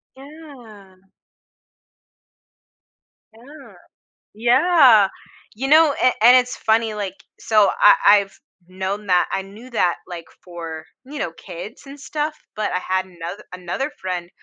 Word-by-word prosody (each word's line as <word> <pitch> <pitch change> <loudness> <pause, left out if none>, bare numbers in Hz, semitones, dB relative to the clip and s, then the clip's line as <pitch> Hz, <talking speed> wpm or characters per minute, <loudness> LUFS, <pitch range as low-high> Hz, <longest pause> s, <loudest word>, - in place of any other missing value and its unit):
Yeah. 245 -10 -15 2.3
Yeah, 275 +6 -15 0.6
yeah, 240 - +4 0.5
you 265 +5 -4
know, 310 -1 +5
a - - +4 0.2
and 245 +2 +8
it's 250 0 +1
funny, 220 0 0
like, 200 -3 -5 0.2
so 215 -3 +3
I - - +8 0.3
I've 195 0 -10 0.3
known 190 +3 -5
that 180 -1 +3
I 195 - -1
knew 215 +6 -14
that 180 -7 0
like 170 -2 -9 0.2
for, 165 -3 -8 0.2
you 285 +2 -9
know, 165 - -3
kids 175 +6 -10
and 280 +1 -11
stuff, 300 +2 -4 0.2
but 215 - -2
I 180 - 0
had 185 +1 -2
anoth 175 +2 -9
another 180 - -4
friend 180 -2 -4
210 Hz, 130 wpm, -20 LUFS, 185-265 Hz, 2.3 s, and